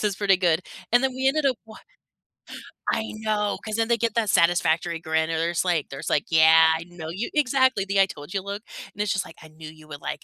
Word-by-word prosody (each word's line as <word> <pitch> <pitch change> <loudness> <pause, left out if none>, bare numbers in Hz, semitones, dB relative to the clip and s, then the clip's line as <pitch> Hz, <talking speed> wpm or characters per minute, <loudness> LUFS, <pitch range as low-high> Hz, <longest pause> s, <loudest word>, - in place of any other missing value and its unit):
This - - -4
is 205 -2 0
pretty 195 -2 +3
good." 175 -2 +1 0.3
And 245 +2 +4
then 265 - +1
we 265 +1 +1
ended 300 +1 +1
up 260 -3 +1
wa 220 - -13 1.2
I 220 - -1
know 215 -1 -1
'cause 215 -1 -3
then 225 0 0
they 235 - +3
get 230 0 -1
that 225 -3 +1
satisfactory 170 -1 +2
grin, 160 0 -1
and 165 - -1
there's 170 +2 0
like 170 -5 0
there's 135 - -6
like, 150 - +1
"Yeah, 160 0 +6
I 165 - -7
know 175 -2 -9
you" 190 +8 -4
Exactly! 260 -6 +2
The 195 0 +1
I 195 - +5
told 155 0 -10
you 195 - -1
look, 200 +2 -6 0.3
and 205 - -11
it's 210 - 0
just 190 - -1
like, 165 - -14
"I 160 - -13
knew 155 0 -11
you 155 -1 -17
would 145 -2 -9
like - - -4
190 Hz, 250 wpm, -24 LUFS, 160-220 Hz, 1.2 s, Yeah